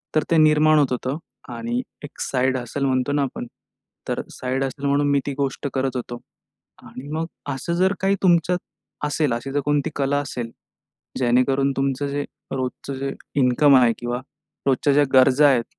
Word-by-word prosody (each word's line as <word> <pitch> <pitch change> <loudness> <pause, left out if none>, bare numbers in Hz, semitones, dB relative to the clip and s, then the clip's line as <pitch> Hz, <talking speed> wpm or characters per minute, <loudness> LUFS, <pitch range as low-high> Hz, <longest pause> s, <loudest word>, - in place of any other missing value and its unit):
तर 155 - +3
ते 165 - +5
निर्माण 155 0 +5
होत 140 -3 +2
होतं. 130 +3 -2 0.4
आणि 120 +1 -2 0.2
एक 145 - -10
साइड 130 0 +1
हसल 130 +3 -3
म्हणतो 130 0 +1
ना 145 - +2
आपण, 125 -2 -5 0.6
तर - - -1
साइड 130 +1 -2
हसल 135 +1 -4
म्हणून, 145 +1 +2
मी 140 - +3
ती 140 - -2
गोष्ट 140 0 -2
करत 130 -1 0
होतो. 120 -1 -5 0.6
आणि 130 +3 -10
मग 160 +1 -1 0.3
असं, 170 +5 -3
जर 190 +3 +3
काही 195 +1 +3
तुमच्यात 175 0 +3 0.5
असेल, 150 -2 0
अशी 120 +4 -4
जर 145 - 0
कोणती 145 -1 +1
कला 140 0 +1
असेल, 120 -5 -5 0.7
जेणेकरून 130 +2 +2
तुमचं 135 +1 0
जे 145 +1 -2 0.3
रोजचं 130 +1 -4
जे 135 +1 -2 0.3
इन्कम 135 +3 +5
आहे 120 -2 +5
किंवा 120 0 -3 0.5
रोजच्या, 140 +1 +3
ज्या 145 0 +5
गरजा 135 +2 +6
आहेत 125 -4 +3
135 Hz, 170 wpm, -22 LUFS, 130-145 Hz, 0.7 s, गरजा